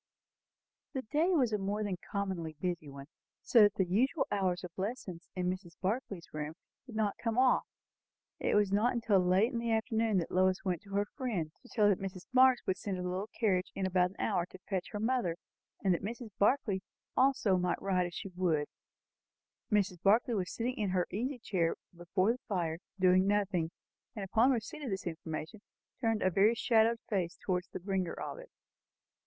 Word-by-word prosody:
The 265 -2 -2
day 305 +10 +1
was 250 -8 +2
a 210 - +1
more 205 +2 -1
than 195 -3 -2
commonly 190 -5 -2
busy 175 -4 -2
one, 140 0 -9 0.4
so 235 - +6
that 205 -1 +6
the 190 - +2
usual 245 - +2
hours 190 -2 0
of 180 - -6
lessons 190 -4 -5
in 180 -1 -1
Mrs. 180 -2 -4
Barclay's 195 -3 -3
room 155 +1 -4 0.3
did 235 - -9
not 210 -2 0
come 230 0 0
off. 255 0 +4 0.7
It - - +1
was 205 -2 +3
not 230 +3 +2
till 205 -4 +4
late 185 +7 +3
in 235 - -1
the 230 0 -1
afternoon 220 -1 +1
that 170 - -1
Lois 185 +1 +2
went 180 -4 0
to 200 -1 -8
her 205 +1 +2
friend, 205 - -3
to 245 - -17
tell 215 -3 +2
her 205 - +6
that 185 - -7
Mrs. 185 -2 -6
Marx 255 -1 +6
would 190 - 0
send 195 -1 -3
her 180 - -4
little 185 +4 -3
carriage 190 -5 +1
in 195 - -1
about 180 -1 +3
an 190 - -17
hour 180 -5 0
to 185 - -12
fetch 190 -3 -2
her 210 - -5
mother, 225 -7 +1 0.5
and 190 -2 +4
that 170 - -1
Mrs. 230 +2 -6
Barclay 205 -3 +2 0.3
also 260 -8 +3
might 180 -1 0
ride 185 -2 +1
if 175 - -10
she 195 - -5
would. 175 -5 0 1.1
Mrs. 195 -4 +1
Barclay 225 +4 +4
was 185 -4 -1
sitting 245 +2 -2
in 210 -3 0
her 180 -1 +1
easy 250 +7 -2
chair 180 -8 0 0.2
before 185 +4 +1
the 250 - -4
fire, 170 -5 -1 0.2
doing 185 +1 +5
nothing, 200 -5 +1 0.5
and 200 -3 -4
on 235 +3 +5
receipt 265 +5 -2
of 275 - -4
this 195 -1 -3
in 170 -2 -2
formation 160 +6 -6 0.4
turned 225 -3 +1
a 185 - +3
very 205 +6 +4
shadowed 230 -1 +3
face 180 -5 -1
towards 180 -1 -1
the - - -6
bringer 185 -1 -1
of - - -6
it. - - -11
195 Hz, 200 wpm, -32 LUFS, 180-225 Hz, 1.1 s, so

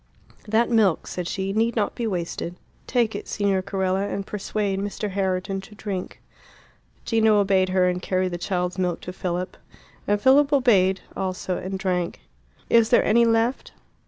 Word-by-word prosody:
"That 225 +3 +2
milk," 210 -7 +3
said 180 -2 -5
she, 195 +1 -2
"need 225 +2 +1
not 215 -3 0
be 235 - -3
wasted. 175 -2 -3 0.3
Take 235 -3 +1
it, - - -6
Signor 200 -2 0
Carella, 190 0 -1
and 200 -1 -4
persuade 205 -1 -2
Mr. 205 +1 -3
Herriton 190 0 -1
to 210 +2 -14
drink." 195 -3 -5 0.9
Gino 220 -2 +3
obeyed 190 -2 +2
her, 185 -1 +3
and 180 0 -1
carried 185 0 0
the 175 - -4
child's 180 0 -2
milk 180 -2 -1
to 180 - -7
Philip. 180 0 -3 0.5
And 205 0 +2
Philip 275 +5 +5
obeyed 200 -9 +3
also 185 -1 -2
and 190 +1 -4
drank. 180 -2 -2 0.5
"Is 230 -1 +4
there 240 - +4
any 235 +2 +4
left?" 230 +2 0
195 Hz, 160 wpm, -24 LUFS, 185-220 Hz, 0.9 s, Philip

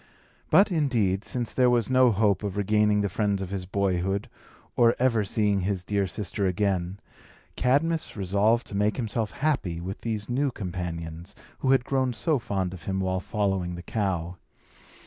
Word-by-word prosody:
But, 200 +1 +5
indeed, 115 - +1
since 120 -2 -3
there 125 -1 +4
was 120 -3 +2
no 130 -1 +5
hope 105 -1 +2
of 100 -2 -4
regaining 105 +1 +2
the 100 - +1
friends 100 +1 0
of 95 -1 -5
his 95 -2 -4
boyhood, 95 +3 -1 0.5
or 120 -1 +4
ever 120 -4 +2
seeing 105 0 +1
his 95 -1 -2
dear 100 0 0
sister 100 +2 -2
again, 95 0 -1 0.6
Cadmus 150 +3 +1
resolved 100 +5 +2
to 100 - -7
make 105 +1 +1
himself 115 -3 -2
happy 130 - -1
with 95 +3 -6
these 110 -2 -3
new 135 +3 +1
companions, 85 -5 -6 0.2
who 130 - 0
had 130 -2 +4
grown 130 -2 0
so 135 +6 0
fond 95 -6 -2
of 85 -4 -11
him 95 0 -1
while 95 -1 0
following 95 -3 -1
the 85 - -8
cow. 90 -5 -2
100 Hz, 165 wpm, -26 LUFS, 95-120 Hz, 0.6 s, But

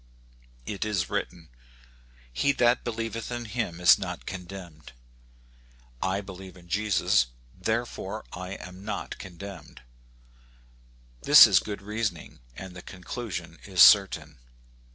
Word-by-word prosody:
It 100 - -3
is 100 -5 -2
written, 85 -3 -4 0.4
" - - -29 0.3
He 140 - +2
that 120 -2 +2
believeth 115 0 -4
in 120 -1 -4
him 110 -7 -3
is 90 +3 +6
not 90 -3 -6
condemned. 90 -5 -9 1.1
I 95 +1 0
believe 95 -2 -11
in 85 -1 -17
Jesus, 95 - +2 0.3
therefore 110 - -3
I 90 +2 -6
am 90 0 -10
not 105 - -5
condemned. 90 -7 -10 1.4
This - - +10
is - - +5
good 100 -2 -7
reasoning, 105 - -4 0.2
and 95 -1 -9
the 90 - -8
conclusion 95 +4 -7
is 95 -3 +6
certain. 95 -9 +5
95 Hz, 120 wpm, -27 LUFS, 90-110 Hz, 1.4 s, This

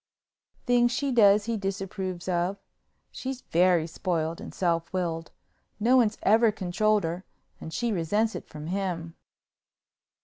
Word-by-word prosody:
"Things 240 -1 +3
she 275 +3 -1
does 205 -3 +5
he 230 -1 -1
disapproves 190 -2 -4
of. 180 +2 0 0.5
She's 260 0 -5
very 175 -1 +3
spoiled 165 -1 -2
and - - -8
self 170 -2 -1
willed. 165 -3 -2 0.5
No 240 +4 +4
one's 225 -4 +3
ever 220 +2 +5
controlled 210 +3 +1
her 170 +3 -3 0.4
and 160 - -8
she 235 +7 -1
resents 205 +5 0
it - - -7
from 150 0 -8
him." 175 -2 -3
190 Hz, 135 wpm, -27 LUFS, 170-220 Hz, 0.5 s, does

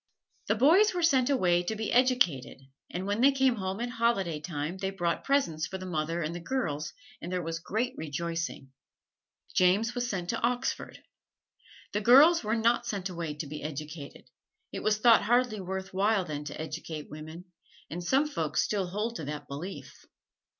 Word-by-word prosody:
The 215 - +2
boys 350 - +5
were 350 - 0
sent 265 -6 +4
away 180 -10 +3
to 200 +5 -3
be 220 0 -3
educated, 245 - +2 0.3
and 180 +2 -4
when 205 +3 -1
they 275 +2 +7
came 265 -3 +2
home 190 0 -3
at 240 +1 -3
holiday 230 -9 0
time 150 +2 -4
they 190 - -1
brought 175 -3 -1
presents 165 - +1
for 190 - -5
the 185 - -8
mother 165 -1 -2
and 155 +2 -3
the 175 - -5
girls, 160 - -2 0.3
and 175 - -6
there 180 -1 -1
was 165 0 -3
great 225 +8 -2
rejoicing. 165 -2 -4 0.8
James 200 +6 +3
was 245 -1 -2
sent 180 -4 -2
to - - -3
Oxford. 245 +2 -2 0.9
The 210 - 0
girls 280 +9 +7
were 215 +1 0
not 235 +1 +2
sent 195 -3 -3
away 165 -4 -4
to 150 - -5
be 150 +1 -7
educated 150 0 -7 0.5
it - - -5
was 215 0 +2
thought 230 +1 +6
hardly 240 0 +2
worth 190 +1 -5
while 200 0 +2
then 150 -2 -5
to 145 - -7
educate 155 0 -6
women, 155 +3 -9 0.5
and 175 +2 -4
some 270 +11 +2
folks 165 - 0
still 200 -3 -1
hold 215 +5 -3
to 155 - -6
that 150 +1 -6
belief. 160 +8 -8
190 Hz, 180 wpm, -29 LUFS, 165-235 Hz, 0.9 s, they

